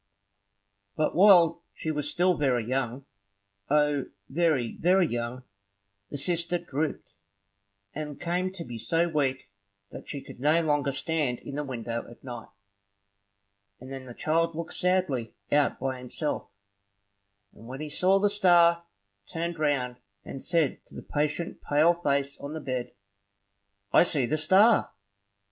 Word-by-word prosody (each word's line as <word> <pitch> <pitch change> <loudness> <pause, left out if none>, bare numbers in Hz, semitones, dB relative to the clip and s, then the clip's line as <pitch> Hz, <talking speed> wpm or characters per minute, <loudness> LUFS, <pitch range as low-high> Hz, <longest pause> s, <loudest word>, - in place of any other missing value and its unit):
But 155 - 0
while 175 -3 +6
she 160 - -3
was 150 -1 -1
still 180 +3 +2
very 130 -6 +1
young, 130 +1 -2 0.6
O, 150 -2 +2 0.2
very, 150 -6 +1
very 180 +2 +4
young, 120 +1 -4 0.7
the - - -5
sister 170 +3 +2
drooped, 155 -3 -4 0.8
and 150 -1 -6
came 180 +2 -1
to 180 -3 -5
be 120 -6 -8
so 165 +7 +1
weak 135 -9 -1 0.4
that - - -10
she 140 -2 -5
could - - -12
no 150 +5 +3
longer 145 -2 +1
stand 140 -3 0
in 140 - -8
the 150 +1 -2
window 115 -3 -5
at 120 - -15
night; 120 -3 -7 1.3
and 130 +2 -11
then 135 -1 -7
the 120 - -10
child 165 +1 0
looked 170 0 -5
sadly 180 -11 0 0.2
out 145 0 +2
by 130 0 -3
himself, 125 +4 -4 1.0
and 115 - -14
when 130 +2 -7
he 155 - -4
saw 185 +6 +3
the 205 +1 +3
star, 175 -4 +4 0.5
turned 170 0 -3
round 130 -5 0 0.3
and 135 - -8
said 165 -5 0
to - - -13
the - - -8
patient 150 +3 -2
pale 155 +4 +4
face 140 -4 -1
on 140 +1 -6
the 160 - -4
bed, 130 -4 -4 1.0
"I - - +7
see 150 -7 +2
the 140 +6 0
star!" 190 +9 +4
150 Hz, 145 wpm, -27 LUFS, 130-170 Hz, 1.3 s, I